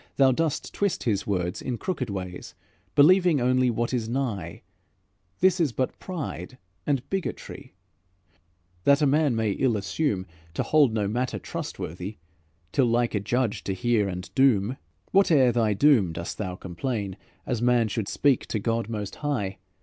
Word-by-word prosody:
Thou 135 Hz, -1 st, +5 dB
dost 155 Hz, +3 st, -1 dB
twist 200 Hz, -4 st, -1 dB
His 105 Hz, -5 st, 0 dB
words 90 Hz, -3 st, -1 dB
in 125 Hz, -2 st, -3 dB
crooked 140 Hz, -, -3 dB
ways 90 Hz, -2 st, -6 dB, 0.4 s
Believing 175 Hz, +1 st, +6 dB
only 130 Hz, 0 st, +3 dB
what 120 Hz, +1 st, -1 dB
is 115 Hz, -3 st, -1 dB
nigh; 115 Hz, -10 st, -3 dB, 0.8 s
This 185 Hz, 0 st, +4 dB
is 155 Hz, -8 st, +1 dB
but 130 Hz, +1 st, -2 dB
pride 150 Hz, -7 st, -6 dB, 0.3 s
and 140 Hz, -4 st, 0 dB
bigotry, 190 Hz, -, -5 dB, 1.1 s
That 140 Hz, +5 st, +4 dB
a -, -, +6 dB
good 135 Hz, -, +3 dB
man 150 Hz, -4 st, +3 dB
may 110 Hz, -2 st, +1 dB
ill 120 Hz, +1 st, +1 dB
assume, 100 Hz, 0 st, -1 dB, 0.3 s
To -, -, 0 dB
hold 150 Hz, -5 st, +4 dB
no 105 Hz, -2 st, 0 dB
matter 120 Hz, +4 st, -1 dB
trustworthy 90 Hz, +6 st, -6 dB, 0.5 s
Till 130 Hz, -3 st, +3 dB
like 120 Hz, 0 st, +1 dB
a 105 Hz, -, +1 dB
judge 115 Hz, +2 st, -1 dB
he 95 Hz, -, -2 dB
hear 110 Hz, 0 st, +1 dB
and 90 Hz, 0 st, -6 dB
doom. 130 Hz, -3 st, +3 dB, 0.3 s
"Whate'er 155 Hz, -10 st, +5 dB
thy 115 Hz, -3 st, +2 dB
doom, 115 Hz, -, +4 dB
dost 85 Hz, +1 st, -5 dB
thou 95 Hz, -4 st, -3 dB
complain 95 Hz, +2 st, -4 dB, 0.3 s
As 120 Hz, -3 st, -2 dB
man 120 Hz, -2 st, +3 dB
should 105 Hz, -1 st, -3 dB
speak 140 Hz, -4 st, +2 dB
to -, -, -2 dB
God 115 Hz, +1 st, -1 dB
most 105 Hz, -3 st, -5 dB
high? 115 Hz, -11 st, -2 dB
120 Hz, 160 wpm, -26 LUFS, 100-140 Hz, 1.1 s, Believing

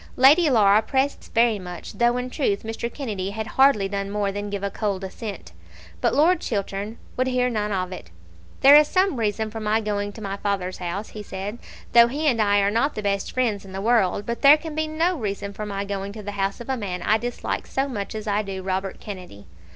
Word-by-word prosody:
Lady 295 Hz, +6 st, +6 dB
Laura 210 Hz, -4 st, +5 dB
pressed 265 Hz, +5 st, 0 dB
this -, -, -16 dB
very 230 Hz, -2 st, +2 dB
much, 180 Hz, +1 st, -8 dB
though 240 Hz, +3 st, +2 dB
in 250 Hz, 0 st, -4 dB
truth 210 Hz, -10 st, 0 dB
Mr. 225 Hz, +1 st, -4 dB
Kennedy 210 Hz, -10 st, -4 dB
had 220 Hz, +2 st, -4 dB
hardly 250 Hz, -5 st, +3 dB
done 200 Hz, 0 st, -3 dB
more 205 Hz, -1 st, -1 dB
than 205 Hz, +1 st, -4 dB
give 200 Hz, -1 st, -4 dB
a 200 Hz, -, -1 dB
cold 200 Hz, -3 st, -2 dB
assent. 195 Hz, -, -7 dB, 0.5 s
But -, -, +2 dB
Lord 320 Hz, +5 st, +4 dB
Chiltern 205 Hz, +1 st, -3 dB, 0.2 s
would 255 Hz, +1 st, 0 dB
not -, -, 0 dB
hear 250 Hz, -1 st, +1 dB, 0.2 s
of 185 Hz, -2 st, -2 dB
it. 180 Hz, -, -8 dB, 0.5 s
"There 275 Hz, +2 st, +9 dB
is 300 Hz, 0 st, +7 dB
some 370 Hz, -4 st, +2 dB
reason 220 Hz, -1 st, -1 dB
for 225 Hz, -, -5 dB
my 215 Hz, 0 st, +1 dB
going 205 Hz, -1 st, -2 dB
to -, -, -10 dB
my 200 Hz, -1 st, -4 dB
father's 195 Hz, -3 st, -2 dB
house," 185 Hz, +4 st, -5 dB
said 200 Hz, +4 st, -6 dB
he, -, -, -18 dB, 0.3 s
"though 235 Hz, 0 st, +8 dB
he 290 Hz, +6 st, -3 dB
and 245 Hz, -7 st, +3 dB
I 205 Hz, -1 st, +3 dB
are 200 Hz, 0 st, +2 dB
not 255 Hz, +7 st, +1 dB
the 215 Hz, -, -4 dB
best 200 Hz, -1 st, -1 dB
friends 230 Hz, -6 st, 0 dB
in 190 Hz, -1 st, -12 dB
the 190 Hz, -, -4 dB
world; 205 Hz, -3 st, +2 dB
but 235 Hz, +1 st, -4 dB
there 285 Hz, +2 st, +8 dB
can 315 Hz, 0 st, -7 dB
be 315 Hz, +1 st, -1 dB
no 330 Hz, +4 st, +1 dB
reason 200 Hz, -2 st, -4 dB
for 210 Hz, +1 st, -5 dB
my 200 Hz, -1 st, -3 dB
going 200 Hz, 0 st, -4 dB
to 215 Hz, -1 st, -8 dB
the 205 Hz, -, -4 dB
house 195 Hz, -1 st, -2 dB
of 235 Hz, -, -9 dB
a 265 Hz, -, +1 dB
man 185 Hz, -6 st, -4 dB
I 215 Hz, +1 st, +3 dB
dislike 245 Hz, +1 st, -4 dB
so 270 Hz, +1 st, -1 dB
much 210 Hz, -6 st, -5 dB
as 215 Hz, 0 st, -5 dB
I 210 Hz, 0 st, +1 dB
do 195 Hz, -2 st, -6 dB
Robert 190 Hz, 0 st, -3 dB
Kennedy." 180 Hz, -, -9 dB
210 Hz, 235 wpm, -24 LUFS, 200-245 Hz, 0.5 s, There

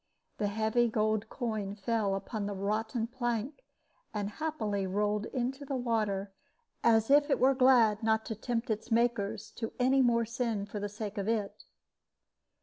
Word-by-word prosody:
The 205 Hz, -, +1 dB
heavy 220 Hz, +3 st, +2 dB
gold 215 Hz, -1 st, 0 dB
coin 215 Hz, -5 st, -3 dB
fell 205 Hz, -1 st, 0 dB
upon 200 Hz, +1 st, -4 dB
the 205 Hz, -, -3 dB
rotten 220 Hz, +4 st, -1 dB
plank, 240 Hz, -, -3 dB, 0.5 s
and 205 Hz, 0 st, -2 dB
happily 215 Hz, -9 st, -2 dB
rolled 205 Hz, +2 st, 0 dB
into 265 Hz, +2 st, -3 dB
the 275 Hz, -1 st, -3 dB
water, 215 Hz, -5 st, -1 dB, 0.5 s
as 225 Hz, +1 st, +4 dB
if 290 Hz, +1 st, +5 dB
it 275 Hz, -, +3 dB
were 265 Hz, +2 st, +5 dB
glad 250 Hz, -5 st, +5 dB
not 220 Hz, 0 st, +1 dB
to -, -, -3 dB
tempt 235 Hz, +2 st, -2 dB
its 215 Hz, +2 st, -3 dB
makers 230 Hz, -3 st, 0 dB
to 225 Hz, -1 st, -4 dB
any 265 Hz, +2 st, +4 dB
more 235 Hz, -2 st, +3 dB
sin 230 Hz, -3 st, -2 dB
for 205 Hz, +1 st, -6 dB
the 205 Hz, 0 st, -3 dB
sake 210 Hz, 0 st, -5 dB
of 200 Hz, -, -3 dB
it. 215 Hz, -3 st, -2 dB
220 Hz, 160 wpm, -31 LUFS, 205-240 Hz, 0.5 s, if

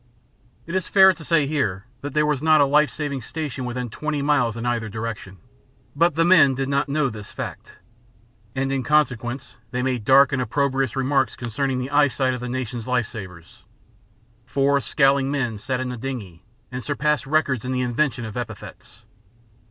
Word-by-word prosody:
It 170 Hz, -, -7 dB
is 185 Hz, -2 st, -1 dB
fair 190 Hz, -1 st, +7 dB
to 165 Hz, -, -12 dB
say 155 Hz, -2 st, +2 dB
here 125 Hz, -10 st, -1 dB, 0.2 s
that 145 Hz, 0 st, -6 dB
there 150 Hz, 0 st, +3 dB
was 150 Hz, -3 st, 0 dB
not 155 Hz, 0 st, +5 dB
a 145 Hz, -, +6 dB
life 150 Hz, +1 st, +3 dB
saving 145 Hz, -2 st, -4 dB
station 140 Hz, 0 st, -5 dB
within 125 Hz, 0 st, -3 dB
twenty 150 Hz, +5 st, -3 dB
miles 125 Hz, -6 st, +2 dB
in 115 Hz, -, -4 dB
either 120 Hz, -2 st, -1 dB
direction, 110 Hz, -3 st, -6 dB, 0.6 s
but 170 Hz, +1 st, +3 dB
the 165 Hz, +1 st, +3 dB
men 165 Hz, -7 st, +6 dB
did 135 Hz, +1 st, -2 dB
not 140 Hz, +1 st, 0 dB
know 145 Hz, 0 st, +1 dB
this 110 Hz, -4 st, -8 dB
fact, -, -, -7 dB, 0.8 s
and 135 Hz, 0 st, -1 dB
in 135 Hz, -1 st, 0 dB
consequence 125 Hz, -2 st, 0 dB
they 125 Hz, 0 st, -2 dB
made 125 Hz, -4 st, -1 dB
dark 135 Hz, +3 st, +6 dB
and 130 Hz, -, +1 dB
opprobrious 135 Hz, 0 st, 0 dB
remarks 135 Hz, 0 st, +1 dB
concerning 130 Hz, +3 st, -2 dB
the 130 Hz, +2 st, -4 dB
eyesight 140 Hz, -3 st, +2 dB
of 125 Hz, -, -4 dB
the 125 Hz, -, -4 dB
nation's 125 Hz, -2 st, -4 dB
life 125 Hz, -2 st, +1 dB
savers. 95 Hz, -7 st, -11 dB, 0.8 s
Four 140 Hz, +1 st, +2 dB
scowling 135 Hz, +2 st, +2 dB
men 125 Hz, -7 st, -2 dB
sat 130 Hz, +2 st, -2 dB
in 130 Hz, 0 st, -3 dB
the 125 Hz, -, -5 dB
dingey 110 Hz, -9 st, -6 dB, 0.3 s
and 125 Hz, 0 st, -5 dB
surpassed 150 Hz, 0 st, 0 dB
records 140 Hz, -5 st, +1 dB
in 130 Hz, -, -3 dB
the 130 Hz, 0 st, 0 dB
invention 125 Hz, 0 st, 0 dB
of 110 Hz, -, -8 dB
epithets. 115 Hz, -2 st, -8 dB
130 Hz, 185 wpm, -23 LUFS, 120-145 Hz, 0.8 s, fair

